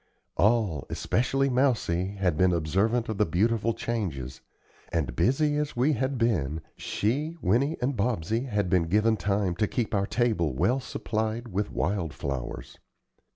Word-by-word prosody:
All, 105 Hz, -, +2 dB
especially 135 Hz, +3 st, +1 dB
Mousie, 110 Hz, -8 st, +1 dB
had 95 Hz, -5 st, +1 dB
been 95 Hz, +2 st, +3 dB
observant 100 Hz, +9 st, +1 dB
of 110 Hz, -3 st, -4 dB
the 105 Hz, -, +4 dB
beautiful 115 Hz, +6 st, +1 dB
changes, 85 Hz, -, -3 dB, 0.5 s
and, 80 Hz, -7 st, -1 dB
busy 145 Hz, -, +2 dB
as 150 Hz, 0 st, -2 dB
we 130 Hz, +6 st, +3 dB
had 130 Hz, +1 st, -1 dB
been, 80 Hz, -, 0 dB
she, 145 Hz, +10 st, -2 dB
Winnie 135 Hz, -, +1 dB
and 135 Hz, +2 st, 0 dB
Bobsey 110 Hz, +1 st, 0 dB
had 105 Hz, -3 st, 0 dB
been 90 Hz, -1 st, +2 dB
given 105 Hz, +5 st, +3 dB
time 100 Hz, -3 st, 0 dB
to 105 Hz, -, +2 dB
keep 115 Hz, 0 st, -2 dB
our 100 Hz, -1 st, +1 dB
table 110 Hz, -, +1 dB
well 125 Hz, -, +2 dB
supplied 110 Hz, -1 st, -3 dB
with 100 Hz, +1 st, -2 dB
wildflowers. 70 Hz, -10 st, -3 dB
105 Hz, 145 wpm, -27 LUFS, 90-120 Hz, 0.5 s, the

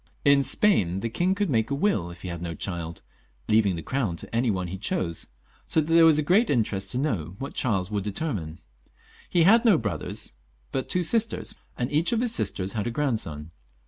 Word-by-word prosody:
In 140 Hz, -1 st, +6 dB
Spain 100 Hz, -, +2 dB
the 115 Hz, -, -3 dB
king 180 Hz, +9 st, +1 dB
could 200 Hz, -5 st, 0 dB
make 110 Hz, -3 st, +1 dB
a 140 Hz, -, 0 dB
will 140 Hz, -, 0 dB
if 85 Hz, 0 st, -12 dB
he 90 Hz, -, -4 dB
had 85 Hz, -1 st, -6 dB
no 85 Hz, -1 st, -4 dB
child, 85 Hz, -3 st, -5 dB, 0.4 s
leaving 105 Hz, -4 st, +3 dB
the 85 Hz, -, -6 dB
Crown 125 Hz, -10 st, -1 dB
to -, -, -7 dB
any 120 Hz, +1 st, +2 dB
one 95 Hz, -3 st, -1 dB
he 95 Hz, +2 st, -6 dB
chose, 85 Hz, -4 st, -2 dB, 0.4 s
so -, -, +3 dB
that 160 Hz, +1 st, 0 dB
there 165 Hz, 0 st, +7 dB
was 155 Hz, -2 st, +5 dB
great 195 Hz, +9 st, +3 dB
interest 105 Hz, -7 st, 0 dB
to 120 Hz, -, -2 dB
know 100 Hz, -, -2 dB
what 140 Hz, +4 st, -6 dB
Charles 100 Hz, -6 st, -1 dB
wonld 100 Hz, -2 st, -2 dB
settle. 90 Hz, -, -3 dB, 0.7 s
He 175 Hz, -, +3 dB
had 185 Hz, -, +7 dB
had 230 Hz, +1 st, +5 dB
no 210 Hz, -7 st, +6 dB
brothers, 110 Hz, -3 st, -3 dB, 0.4 s
but 130 Hz, -, -3 dB
two 180 Hz, -, +1 dB
sisters, 225 Hz, +6 st, 0 dB, 0.2 s
and 120 Hz, +1 st, -2 dB
each 155 Hz, +3 st, +2 dB
of 230 Hz, -, +1 dB
his 245 Hz, -2 st, 0 dB
sisters 95 Hz, -, -1 dB
had 105 Hz, -1 st, -2 dB
a -, -, 0 dB
grandson. 110 Hz, -, -2 dB
115 Hz, 210 wpm, -26 LUFS, -, 0.7 s, there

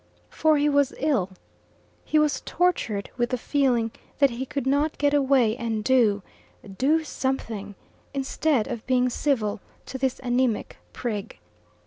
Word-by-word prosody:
For 310 Hz, -1 st, +3 dB
he 290 Hz, +1 st, +2 dB
was 285 Hz, -2 st, +2 dB
ill. 260 Hz, -11 st, +1 dB, 0.7 s
He 310 Hz, -, +1 dB
was 300 Hz, -1 st, +2 dB
tortured 280 Hz, -, 0 dB
with 240 Hz, -1 st, +1 dB
the 255 Hz, -, -1 dB
feeling 245 Hz, -4 st, +1 dB, 0.3 s
that 280 Hz, -2 st, +4 dB
he 250 Hz, +3 st, -4 dB
could 280 Hz, 0 st, -3 dB
not 285 Hz, +3 st, +1 dB
get 285 Hz, 0 st, +2 dB
away 265 Hz, -6 st, +3 dB
and 225 Hz, -3 st, -3 dB
do 220 Hz, -6 st, +3 dB, 0.5 s
do 305 Hz, +9 st, +2 dB
something, 225 Hz, -9 st, -3 dB, 0.4 s
instead 275 Hz, -2 st, 0 dB
of 240 Hz, -4 st, -6 dB
being 250 Hz, -1 st, +2 dB
civil 225 Hz, -8 st, 0 dB, 0.2 s
to 265 Hz, -, -6 dB
this 260 Hz, -1 st, 0 dB
anaemic 245 Hz, -2 st, 0 dB
prig. 215 Hz, -5 st, -4 dB
260 Hz, 140 wpm, -25 LUFS, 230-285 Hz, 0.7 s, that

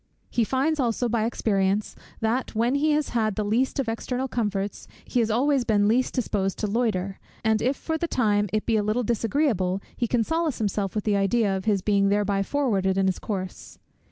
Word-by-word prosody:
He 235 Hz, -, +2 dB
finds 275 Hz, +7 st, 0 dB
also 245 Hz, -1 st, +1 dB
by 230 Hz, -1 st, 0 dB
experience, 205 Hz, -3 st, 0 dB, 0.3 s
that 230 Hz, +2 st, -1 dB
when 235 Hz, +3 st, +2 dB
he 290 Hz, +2 st, +2 dB
has 300 Hz, 0 st, 0 dB
had 220 Hz, -4 st, 0 dB
the 215 Hz, -, -1 dB
least 235 Hz, +6 st, +1 dB
of 265 Hz, -, 0 dB
external 250 Hz, +3 st, -2 dB
comforts, 205 Hz, -5 st, -2 dB, 0.2 s
he 250 Hz, -, 0 dB
has 225 Hz, -2 st, +2 dB
always 265 Hz, +4 st, +2 dB
been 205 Hz, -3 st, +2 dB
least 245 Hz, +4 st, +1 dB
disposed 200 Hz, -6 st, -1 dB
to -, -, -2 dB
loiter; 200 Hz, -4 st, -1 dB, 0.2 s
and 220 Hz, -1 st, +2 dB
if 260 Hz, +3 st, +1 dB
for 320 Hz, -1 st, -3 dB
the 340 Hz, -, -1 dB
time 210 Hz, -7 st, +1 dB
it 215 Hz, 0 st, -1 dB
be 225 Hz, -2 st, +2 dB
a -, -, +2 dB
little 215 Hz, +4 st, 0 dB
disagreeable, 225 Hz, -, 0 dB, 0.2 s
he 235 Hz, -, -1 dB
can 235 Hz, 0 st, +1 dB
solace 320 Hz, +1 st, -1 dB
himself 205 Hz, -2 st, -2 dB
with 210 Hz, -, -1 dB
the 205 Hz, -2 st, +2 dB
idea 200 Hz, 0 st, +2 dB
of 190 Hz, -, -4 dB
his 200 Hz, -4 st, +1 dB
being 200 Hz, -1 st, +3 dB
thereby 200 Hz, -1 st, +1 dB
forwarded 195 Hz, -6 st, 0 dB
in 195 Hz, -, +2 dB
his 190 Hz, -1 st, 0 dB
course. 190 Hz, -3 st, -5 dB
220 Hz, 205 wpm, -25 LUFS, 200-245 Hz, 0.3 s, being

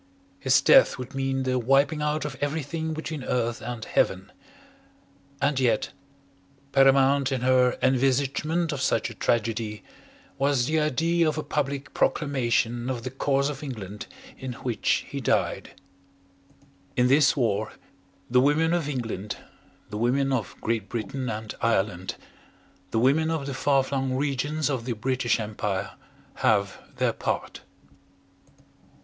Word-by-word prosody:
His 130 Hz, +3 st, +4 dB
death -, -, +6 dB
would 130 Hz, +1 st, -7 dB
mean 135 Hz, 0 st, -1 dB
the 130 Hz, -1 st, 0 dB
wiping 140 Hz, +5 st, +2 dB
out 150 Hz, 0 st, -1 dB
of 145 Hz, -2 st, -4 dB
everything 160 Hz, +2 st, -2 dB
between 155 Hz, -3 st, -5 dB
Earth 120 Hz, -2 st, -1 dB
and 120 Hz, -2 st, -5 dB
Heaven. -, -, 0 dB, 1.1 s
And 140 Hz, -1 st, +1 dB
yet, 120 Hz, -4 st, +1 dB, 0.8 s
paramount 135 Hz, 0 st, +4 dB
in 130 Hz, -2 st, -1 dB
her 125 Hz, 0 st, +3 dB
envisagement 135 Hz, +6 st, +1 dB
of 140 Hz, -3 st, -3 dB
such 135 Hz, -, +1 dB
a -, -, -8 dB
tragedy 110 Hz, -2 st, -1 dB, 0.6 s
was 135 Hz, -3 st, +2 dB
the 155 Hz, +3 st, +1 dB
idea 160 Hz, +3 st, +2 dB
of 155 Hz, -, -3 dB
a 155 Hz, -, -2 dB
public 140 Hz, -1 st, -3 dB
proclamation 120 Hz, -4 st, 0 dB
of 120 Hz, -3 st, -3 dB
the 130 Hz, -, -4 dB
cause 135 Hz, +1 st, +1 dB
of 145 Hz, -2 st, -5 dB
England 105 Hz, -8 st, -7 dB, 0.3 s
in 130 Hz, -1 st, -5 dB
which 120 Hz, -2 st, -1 dB
he -, -, -5 dB
died. -, -, -1 dB, 1.2 s
In 125 Hz, -, +4 dB
this 140 Hz, +3 st, +4 dB
war 110 Hz, -4 st, 0 dB, 0.6 s
the 125 Hz, +1 st, +4 dB
women 155 Hz, +4 st, +3 dB
of 165 Hz, -4 st, 0 dB
England 110 Hz, -6 st, -4 dB, 0.5 s
the 105 Hz, -, -4 dB
women 135 Hz, +4 st, +1 dB
of 115 Hz, -7 st, -3 dB
Great 110 Hz, -3 st, -1 dB
Britain 120 Hz, +3 st, -3 dB
and 110 Hz, 0 st, -5 dB
Ireland 95 Hz, -5 st, 0 dB, 0.7 s
the 110 Hz, -, -2 dB
women 140 Hz, +7 st, +3 dB
of 160 Hz, -4 st, -2 dB
the 140 Hz, -, -4 dB
far 135 Hz, +1 st, +2 dB
flung 135 Hz, -1 st, -2 dB
regions 145 Hz, +2 st, -1 dB
of 130 Hz, -5 st, -2 dB
the 125 Hz, -, -1 dB
British 120 Hz, +1 st, 0 dB
Empire, 105 Hz, -2 st, -3 dB, 0.5 s
have 100 Hz, -2 st, +1 dB, 0.2 s
their -, -, +1 dB
part. -, -, -3 dB
130 Hz, 140 wpm, -26 LUFS, 115-140 Hz, 1.2 s, death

